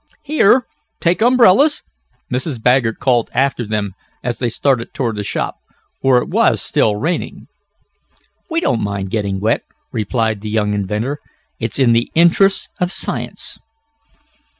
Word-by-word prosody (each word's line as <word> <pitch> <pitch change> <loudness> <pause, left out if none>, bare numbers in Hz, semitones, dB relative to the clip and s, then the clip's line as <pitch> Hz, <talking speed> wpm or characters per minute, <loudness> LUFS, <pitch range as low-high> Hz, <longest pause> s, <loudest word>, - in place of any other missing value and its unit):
"Here, 265 -5 +3 0.3
take 175 +3 +1
umbrellas!" 250 +4 +5 0.5
Mrs. 130 0 -2
Baggert 125 -1 +2
called 125 -3 +1
after 130 -4 0
them 105 -2 -2 0.3
as 120 -1 -3
they 120 - 0
started 125 0 0
toward 115 -4 -1
the 105 - -3
shop, - - -3 0.4
for 135 -2 +4
it - - 0
was - - +2
still 105 - +1
raining. 160 +11 -3 1.0
"We 330 0 0
don't 120 - 0
mind 100 -2 -3
getting 100 -3 -1
wet," 110 +3 +1 0.3
replied 110 -1 -1
the 110 - -5
young 105 -1 0
inventor. 105 +8 -2 0.4
"It's - - -3
in 130 -4 +4
the 115 0 +1
interests 175 +4 +4
of 180 0 0
science." - - -4
120 Hz, 140 wpm, -17 LUFS, 110-170 Hz, 1.0 s, umbrellas